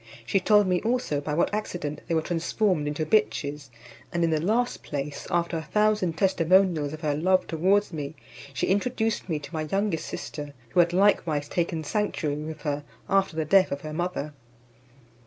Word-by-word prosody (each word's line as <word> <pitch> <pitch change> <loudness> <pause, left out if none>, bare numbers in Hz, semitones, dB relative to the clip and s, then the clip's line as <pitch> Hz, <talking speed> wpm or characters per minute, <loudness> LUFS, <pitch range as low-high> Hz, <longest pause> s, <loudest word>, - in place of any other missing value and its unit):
She 195 - +2
told 210 +1 +4
me 180 -1 +1
also 225 - 0
by 150 0 -2
what 170 - +1
accident 175 -8 -3
they 165 - 0
were 160 - +1
transformed 175 -1 0
into 150 +1 -2
bitches: 150 -8 0 0.4
and 170 0 0
in 165 - +2
the 155 -1 +1
last 230 +8 0
place, 145 0 -5
after 170 -1 0
a - - -3
thousand 210 0 +1
testimonials 180 -4 +3
of 155 0 -8
her 150 -3 0
love 185 +5 +2
towards 190 +4 +1
me, 150 -1 -5 0.4
she - - -1
introduced 220 +1 0
me 160 - 0
to 150 +3 -10
my 160 - -2
youngest 195 -4 0
sister, 145 -1 -6
who 180 - +1
had 170 0 +5
likewise 175 -6 +2
taken 165 -1 -1
sanctuary 155 -5 -1
with 155 +1 -6
her 145 -1 -2 0.2
after 195 -3 +2
the 160 -1 -1
death 190 +4 +4
of 140 0 -3
her 155 0 -6
mother. 165 -3 -3
165 Hz, 180 wpm, -26 LUFS, 150-195 Hz, 0.4 s, had